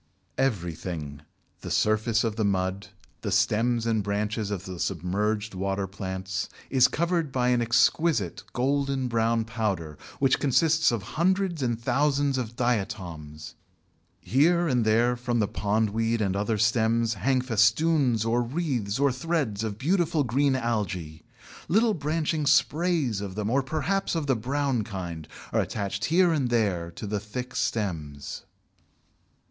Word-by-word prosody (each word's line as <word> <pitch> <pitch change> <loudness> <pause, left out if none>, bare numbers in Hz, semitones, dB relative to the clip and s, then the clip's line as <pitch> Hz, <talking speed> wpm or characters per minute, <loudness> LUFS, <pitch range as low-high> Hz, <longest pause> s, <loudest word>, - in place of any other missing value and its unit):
Everything, 85 - -2 0.4
the - - -7
surface 110 +1 +2
of 115 -2 -1
the 110 - -1
mud, 95 0 -1 0.3
the - - -3
stems 115 +2 +2
and 110 -2 +1
branches 105 +1 -2
of 95 -2 -4
the 90 -2 -7
submerged 100 +5 -1
water 95 +1 -2
plants, 95 0 -4 0.2
is 130 -2 +6
covered 170 -3 -1
by 125 -1 +1
an 125 -1 +2
exquisite 115 - +2
golden 135 0 0
brown 115 -1 +1
powder, 100 - -3 0.2
which 135 -2 +2
consists 155 +2 +3
of 115 -4 -2 0.2
hundreds 185 -2 +1
and 120 -3 -1
thousands 140 +2 +1
of 120 -2 -5
"Diatoms." 90 - -3 0.7
Here 170 +7 +3
and 125 -6 +1
there 115 +3 +3
from 120 0 -2
the 105 -3 +2
Pondweed 110 +3 0
and 100 -3 0
other 105 +2 0
stems 115 +1 +2
hang 130 +6 +1
festoons 125 +1 +2
or 115 +2 +2
wreaths 120 -5 -2
or 140 -1 +3
threads 130 -7 -1
of 105 -2 -3
beautiful 160 - +1
green 135 +3 +2
Algæ. 95 -10 -2 0.5
Little 220 +6 +3
branching 155 -1 -1
sprays 145 - +2
of 100 -2 -6
them, 105 +1 -2
or 140 +2 +3
perhaps 160 +8 -1
of 160 -3 -1
the 135 -2 +2
brown 130 +1 -1
kind, 90 -6 -6 0.3
are - - +3
attached 100 0 -3
here 175 +3 +4
and 135 -6 0
there 100 -8 0
to 85 - -8
the 105 0 -2
thick 125 +5 -6
stems. 80 -10 -3
115 Hz, 140 wpm, -26 LUFS, 100-135 Hz, 0.7 s, is